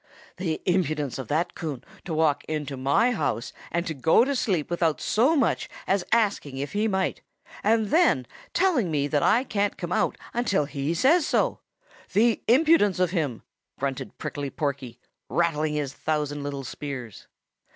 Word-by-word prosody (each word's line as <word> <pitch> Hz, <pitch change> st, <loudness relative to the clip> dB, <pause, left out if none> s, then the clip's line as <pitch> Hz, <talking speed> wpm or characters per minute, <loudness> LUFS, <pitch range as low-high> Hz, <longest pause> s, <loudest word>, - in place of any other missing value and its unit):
"The 170 Hz, -4 st, -3 dB
impudence 155 Hz, -7 st, 0 dB
of 130 Hz, -, -5 dB
that 165 Hz, +6 st, 0 dB
Coon 150 Hz, -7 st, -5 dB, 0.2 s
to 175 Hz, -, -4 dB
walk 155 Hz, -2 st, +2 dB
into 150 Hz, -3 st, -3 dB
my 140 Hz, -, +2 dB
house 140 Hz, -, -2 dB, 0.2 s
and 170 Hz, -5 st, -2 dB
go 165 Hz, -, +5 dB
to 280 Hz, +1 st, -1 dB
sleep 185 Hz, -, 0 dB
without 165 Hz, -3 st, +1 dB
so 255 Hz, +9 st, +2 dB
much 280 Hz, -, +1 dB, 0.2 s
as 195 Hz, -1 st, +1 dB
asking 200 Hz, -, +1 dB
if 140 Hz, +1 st, -4 dB
he 210 Hz, +2 st, +1 dB
might, 190 Hz, -2 st, -1 dB, 0.4 s
and 220 Hz, 0 st, +2 dB
then 315 Hz, -, +4 dB, 0.3 s
telling 335 Hz, -, +2 dB
me 145 Hz, -3 st, 0 dB
that 145 Hz, -1 st, +1 dB
I 235 Hz, -, +4 dB
can't 205 Hz, -5 st, -1 dB
come 175 Hz, -1 st, -5 dB
out -, -, +1 dB, 0.2 s
until 205 Hz, -10 st, +1 dB
he 145 Hz, +2 st, -2 dB
says 300 Hz, -, +4 dB
so! -, -, +1 dB, 0.5 s
The 225 Hz, +2 st, +3 dB
impudence 255 Hz, -, +4 dB
of 180 Hz, -2 st, +2 dB
him!" 150 Hz, -, -2 dB, 0.3 s
grunted 135 Hz, -1 st, -4 dB
Prickly 145 Hz, -1 st, -4 dB
Porky, 135 Hz, -5 st, -3 dB, 0.3 s
rattling 155 Hz, +1 st, +1 dB
his 145 Hz, -3 st, -2 dB
thousand 150 Hz, -2 st, -2 dB
little 140 Hz, -1 st, -4 dB
spears. 125 Hz, -4 st, -7 dB
160 Hz, 160 wpm, -26 LUFS, 145-205 Hz, 0.5 s, go